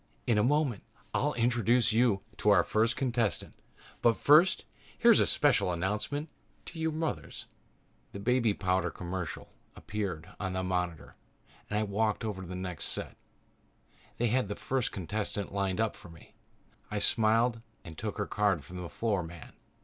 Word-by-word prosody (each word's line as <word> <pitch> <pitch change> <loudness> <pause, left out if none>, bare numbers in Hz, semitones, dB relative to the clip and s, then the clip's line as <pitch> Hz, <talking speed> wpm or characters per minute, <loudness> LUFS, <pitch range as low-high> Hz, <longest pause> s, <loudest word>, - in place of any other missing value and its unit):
In 110 - +3
a - - +3
moment 140 -5 +1 0.3
I'll - - +1
introduce 120 -1 +2
you 110 -4 +3
to 105 - +2
our 100 -4 +6
first 115 +5 +1
contestant. 120 -5 -1 0.5
But 115 -1 +4
first 155 +6 +5 0.3
here - - +6
is - - +6
a - - +4
special 90 - +3
message 105 - -2 0.4
to 165 - -9
you 160 0 0
mothers 160 0 -4 0.3
..." - - -38
The 100 - -7
baby 115 -1 +2
powder 95 -1 +1
commercial 90 -2 -6 0.2
appeared 95 -6 -4
on 95 -2 -2
the 95 0 -1
monitor 90 -3 -3 0.5
and 105 - -1
I 110 - +2
walked 105 +2 0
over 100 -3 -3
to 95 - -8
the 90 - -6
next 90 -4 -5
set. - - -4 1.0
They 120 0 +1
had 125 -1 +1
the 100 - -4
first 130 -2 -1
contestant 100 +1 -3
lined 100 -1 -1
up 110 -2 +1
for 90 - -13
me. 85 -1 -16 0.6
I 105 - -3
smiled 115 +3 +3 0.2
and 80 - -10
took 105 +5 -4
her 105 - -1
card 100 -8 +1
from 90 0 -7
the 85 - -6
floor 100 +6 0
man. 85 -1 -10
105 Hz, 170 wpm, -30 LUFS, 95-115 Hz, 1.0 s, our